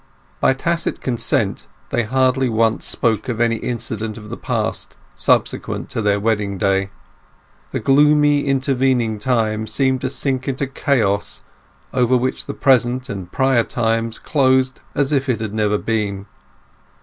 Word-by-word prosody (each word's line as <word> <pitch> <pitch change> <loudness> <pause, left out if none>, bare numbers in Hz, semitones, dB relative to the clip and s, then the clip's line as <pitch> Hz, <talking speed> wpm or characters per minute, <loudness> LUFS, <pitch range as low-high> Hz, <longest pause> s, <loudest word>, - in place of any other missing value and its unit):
By 135 - +3
tacit 170 +5 -1
consent 120 -3 -1 0.2
they 120 - +2
hardly 130 +2 +1
once 115 0 +1
spoke 110 0 0
of 115 -2 -2
any 115 -1 +2
incident 110 -2 -4
of 105 -1 -10
the - - -3
past - - -3 0.2
subsequent - - 0
to 115 - -2
their 100 -1 +2
wedding 105 -2 0
day. 95 -1 +1 0.8
The - - -3
gloomy 145 +1 +4
intervening 130 -5 +1
time 110 -2 0
seemed 130 +3 +1
to 130 - -1
sink 130 -1 -2
into 135 +1 -1
chaos, 115 -7 -1 0.5
over 125 0 +3
which 130 +1 -2
the - - -5
present 125 -1 +2
and 95 -3 -6
prior 130 -2 +3
times 115 -1 -1
closed 130 -3 +1
as 140 0 +1
if 135 -2 +1
it 120 - +1
never 105 -1 +1
had - - -4
been. 100 -3 -1
120 Hz, 145 wpm, -19 LUFS, 110-130 Hz, 0.8 s, gloomy